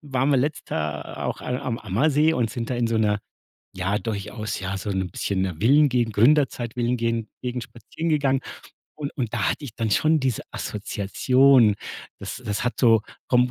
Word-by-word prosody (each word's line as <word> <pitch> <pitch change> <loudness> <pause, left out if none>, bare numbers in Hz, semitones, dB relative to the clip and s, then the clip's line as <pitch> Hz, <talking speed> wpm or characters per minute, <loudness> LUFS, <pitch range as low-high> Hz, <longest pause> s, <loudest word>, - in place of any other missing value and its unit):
waren 135 -1 0
wir 140 - +4
letzt 150 +4 -2
Jahr 75 -1 -3
auch - - -3
a 125 0 -2
am 125 -4 -2
Ammersee 150 - +2
und 120 -5 0
sind 115 +2 -4
da - - 0
in 120 - +1
so 115 - -1
'ner 105 -1 +2 0.6
ja 95 +2 -1
durchaus 110 0 -4
ja 95 0 -3
so 100 +2 -5
'n 95 -2 -1
bisschen 95 +2 -2
'ner 90 -4 -2
Villen-Gegend 125 - +3
Gründerzeit-Villen-Gen 120 -3 +2
Gegend 125 -1 -3
spazieren 140 +8 -6
gegangen. 140 -3 +2 0.6
Und 145 -2 -4
und 120 -5 -2
da 110 -5 +1
hatte - - -4
ich 120 -6 -8
dann 115 -2 -2
schon 155 +8 +3
diese 130 -4 -1
Assoziation. 115 +4 +3 0.5
Das - - -6
das 105 -1 -1
hat 125 - 0
so 115 -4 +5 0.3
vom 125 0 +3
120 Hz, 180 wpm, -24 LUFS, 105-135 Hz, 0.6 s, so